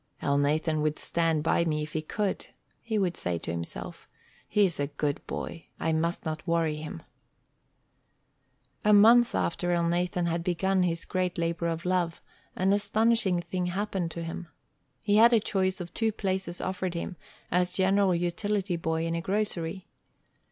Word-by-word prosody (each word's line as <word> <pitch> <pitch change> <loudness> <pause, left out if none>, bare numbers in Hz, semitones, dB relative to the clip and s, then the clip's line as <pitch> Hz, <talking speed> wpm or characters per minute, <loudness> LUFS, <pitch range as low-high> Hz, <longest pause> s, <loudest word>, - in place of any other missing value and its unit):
"Elnathan 150 +2 +1
would 150 0 0
stand 165 -3 0
by 165 +1 +2
me 150 -2 0
if 155 - -8
he 155 - -1
could," 200 +5 -2 0.3
he 220 -2 -2
would 185 -4 +1
say 90 -1 -2
to 85 - -5
himself. 85 0 -6 0.4
"He's 195 -6 +2
a 145 - 0
good 145 0 -2
boy. 165 - -5
I 160 - 0
must 165 +2 -1
not 160 +2 -4
worry 165 -2 +1
him." 150 - -7 1.8
A 210 - +5
month 230 +4 +7
after 175 +1 0
Elnathan 175 +1 +1
had 170 0 -1
begun 185 +2 +1
his 170 -2 0
great 185 -1 -1
labor 170 0 -1
of 165 +1 -3
love, 180 -2 0 0.4
an 190 +2 +2
astonishing 205 -2 +2
thing 180 +1 -3
happened 190 -1 -2
to 170 0 -5
him. 165 +1 -6 0.5
He 205 -1 +2
had 235 +2 +7
a 230 - +6
choice 190 -2 0
of 175 -1 -7
two 225 -1 +1
places 190 -4 -2
offered 185 -1 -2
him 175 +2 -4 0.4
as 180 0 +2
general 190 0 +3
utility 185 +2 -1
boy 160 0 -1
in 165 - -1
a 170 - -1
grocery. 190 -2 -2
175 Hz, 160 wpm, -28 LUFS, 165-195 Hz, 1.8 s, month